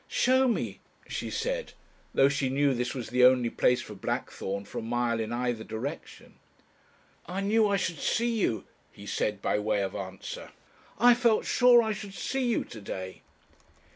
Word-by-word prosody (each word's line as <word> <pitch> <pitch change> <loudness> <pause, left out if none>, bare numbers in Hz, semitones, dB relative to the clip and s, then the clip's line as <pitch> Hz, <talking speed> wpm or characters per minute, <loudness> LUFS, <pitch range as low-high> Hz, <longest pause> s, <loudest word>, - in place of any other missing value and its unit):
"Show 260 +1 +3
me," 235 - -1 0.3
she - - -4
said, - - -3 0.4
though 135 - +5
she 140 -1 0
knew 140 +1 +2
this 125 0 -2
was 125 -4 -5
the 125 0 +3
only 125 -2 +5
place 125 -1 +2
for - - -9
blackthorn 100 +1 -4
for - - -6
a - - -5
mile 115 0 0
in 110 0 -3
either 120 -2 -1
direction. 110 +6 -7 0.9
"I 185 +3 -3
knew 215 +2 +3
I 200 -1 +2
should 170 -5 -2
see 235 -1 0
you," 115 - 0 0.3
he 100 - -13
said, 100 0 -2
by - - +1
way 105 -1 0
of 95 - -3
answer, 95 -1 -7 0.5
"I 245 +2 +7
felt 235 -2 +2
sure 245 -1 +6
I 220 - -1
should 205 -2 -8
see 265 +7 -2
you 235 - +1
to 110 - -11
day." 95 -1 -6
130 Hz, 175 wpm, -28 LUFS, -, 0.9 s, I